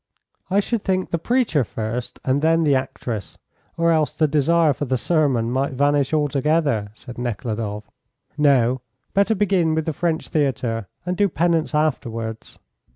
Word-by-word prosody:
"I 195 +2 +3
should 225 +1 -2
think 185 -1 -1
the 170 - 0
preacher 230 - +1
first 115 +2 -5
and 135 +2 +1
then 165 +1 +3
the 145 -3 +3
actress, 125 -5 -3 0.4
or 170 0 +3
else 155 -2 +1
the 155 - +3
desire 155 +2 +3
for 145 - -4
the 130 -1 0
sermon 130 -6 +1
might 135 +2 0
vanish 145 +1 +2
altogether," 145 -6 +1
said 120 +1 -10
Nekhludoff. 110 -3 -3 0.5
"No; 130 -4 +3 0.3
better 200 +3 +3
begin 185 -5 +2
with 160 -1 -1
the 160 - -1
French 165 0 -1
Theatre, 120 - -1 0.2
and 180 0 -1
do 205 +1 +2
penance 165 0 +1
afterwards." 115 -7 -2
145 Hz, 155 wpm, -22 LUFS, 125-165 Hz, 0.5 s, I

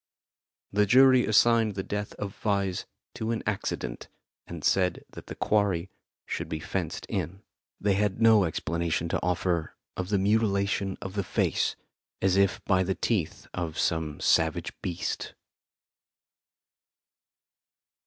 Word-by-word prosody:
The 105 +1 +3
jury 130 +2 +6
assigned 110 -1 +4
the 95 - -2
death 105 +1 -4
of 100 -1 -5
Vyse 100 -3 0 0.3
to 110 - -4
an 115 -1 -1
accident, - - -3 0.4
and - - -8
said 90 -2 +1
that - - -11
the - - -7
quarry 95 -4 +1 0.3
should - - -4
be 80 - -3
fenced 85 +1 -3
in. 95 -1 -4 0.4
They 100 -1 +2
had 100 0 0
no 110 -3 +6
explanation 85 0 -1
to - - -1
offer 90 -2 -1 0.2
of 90 0 -4
the 105 - +2
mutilation 100 -1 +1
of 95 - -6
the 100 -1 -1
face, - - 0 0.4
as 95 -1 +2
if 100 -2 +2
by 95 -1 +3
the 95 +1 0
teeth 100 -9 -1
of 85 -3 -4
some 80 -3 -1
savage 80 -1 +2
beast. 90 -1 -4
95 Hz, 135 wpm, -28 LUFS, 85-105 Hz, 0.4 s, jury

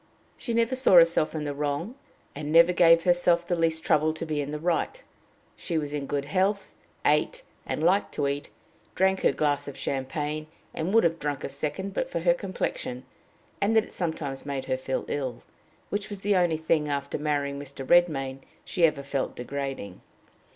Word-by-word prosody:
She 235 - -3
never 230 +2 +2
saw 260 -6 +3
herself 165 -2 +5
in 155 - -2
the 145 -1 -3
wrong, 145 - -2 0.4
and 150 +1 -5
never 170 +2 +6
gave 165 -1 +6
herself 175 -1 +3
the 175 - 0
least 165 -1 0
trouble 155 0 +2
to 160 - -5
be 155 -2 -1
in 140 - -4
the 150 - -3
right. 175 - -1 0.5
She 170 - -3
was 145 -2 -3
in 145 -2 -3
good 140 -1 -2
health, 190 +6 0 0.3
ate, - - +2 0.2
and - - -2
liked 190 +4 +3
to 145 - 0
eat; 140 +1 -3 0.5
drank 190 0 +2
her - - +4
glass 145 -1 0
of 140 - -7
champagne, 150 +3 -3 0.3
and 165 +4 -2
would 225 +2 +5
have 165 -1 +1
drunk 145 -1 -3
a - - -3
second, 150 +8 -4
but 260 - -2
for 170 - -3
her 170 0 +4
complexion, 170 -8 -4 0.6
and 210 +3 +2
that 220 - +5
it - - -14
sometimes 160 -6 -3
made 140 -2 -4
her 130 - 0
feel 130 0 -3
ill, 130 -4 -3 0.5
which 205 +1 -2
was 200 -2 -7
the 205 0 +2
only 175 -3 +2
thing, 160 -1 +1
after 140 0 -2
marrying 145 -2 -1
Mr. 140 -1 -8
Redmain, 135 -7 +3 0.3
she 175 - +3
ever 145 -3 -3
felt 135 -1 -2
degrading. 135 -7 -5
155 Hz, 190 wpm, -27 LUFS, 140-175 Hz, 0.6 s, never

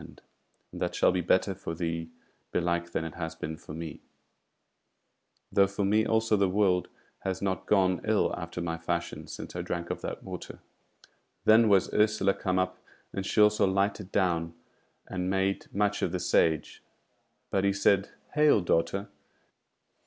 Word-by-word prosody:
And - - -13 0.5
that - - -3
shall - - +4
be 90 0 0
better 95 +3 +2
for 85 -3 -6
thee 80 -1 -3 0.4
belike 85 0 0
than 80 - -2
it 80 - -6
has 80 -1 -5
been 80 -1 -5
for 75 - -10
me; 80 -1 -7 1.5
though 100 0 +5
for 100 +1 -2
me 105 +2 +3
also 110 -1 +2
the 100 -2 +2
world 95 -2 +2 0.3
has 95 -1 -3
not 95 -1 -2
gone 95 -3 +3
ill 110 -1 +2
after 85 0 -6
my 85 -1 -3
fashion 85 +1 -3
since - - -8
I 90 - -2
drank 85 -1 -4
of - - -4
that - - -5
water." - - -7 0.9
Then 110 +1 +6
was 100 -2 +3
Ursula 105 -2 +3
come 90 -1 -1
up, 95 0 -1 0.3
and 95 - -3
she - - 0
also 105 -1 +5
lighted 100 0 0
down 85 -3 0 0.5
and 90 0 -3
made 95 0 -1
much 105 +1 0
of - - 0
the 90 - -1
Sage. 80 -2 +1 0.7
But 95 - +1
he 100 - +3
said: 100 0 +2 0.2
"Hail, 150 -6 +5
daughter! 85 +3 0
95 Hz, 160 wpm, -29 LUFS, 85-100 Hz, 1.5 s, Then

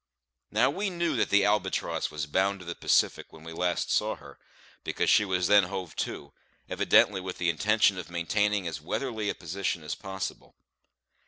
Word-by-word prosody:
Now - - +3
we 200 +1 -2
knew 170 -2 -1
that - - +1
the 100 -1 +4
Albatross 105 -2 0
was 75 0 -4
bound 95 +6 0
to 90 - -11
the 85 - -4
Pacific - - +1
when 80 - -14
we 80 0 -8
last 90 +1 -1
saw - - +1
her, 70 0 -15 0.4
because - - 0
she - - +5
was 90 -3 0
then 100 0 +6
hove 95 -3 -6
to, - - -4 0.3
evidently 95 -2 +3
with 90 -1 -6
the 85 -1 +1
intention 105 +3 +2
of 90 - -8
maintaining 100 +3 0
as 80 -2 -5
weatherly 110 - -3
a - - -2
position 90 0 -3
as 75 - -4
possible. 95 -1 -6
95 Hz, 180 wpm, -28 LUFS, 85-105 Hz, 0.4 s, then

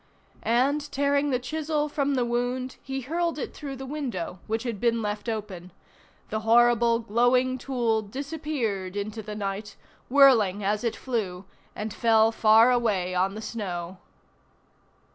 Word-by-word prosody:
And, 280 +5 +1
tearing 285 +1 +1
the 255 - +2
chisel 300 +3 -2
from 285 -1 0
the 250 -2 +1
wound, 245 +2 -2
he 270 0 -4
hurled 335 +5 -1
it - - -5
through 280 -2 -7
the 265 +1 -7
window, 245 - -4
which 225 +2 -1
had 235 -5 -4
been 230 +1 +2
left 210 +2 -3
open; 195 -5 -5 0.6
the 215 - -2
horrible, 235 +1 +4
glowing 245 +3 +2
tool 235 -4 0
disappeared 250 - -4
into 210 +2 -4
the 210 0 -7
night, 205 0 -4 0.3
whirling 235 -8 +5
as 205 +2 0
it 230 - -1
flew, 200 -7 -3 0.3
and 210 -1 -4
fell 225 -1 +4
far 225 +2 +5
away 205 -7 +1
on 190 +2 0
the 220 - -6
snow. 185 -5 -5
235 Hz, 145 wpm, -26 LUFS, 210-265 Hz, 0.6 s, whirling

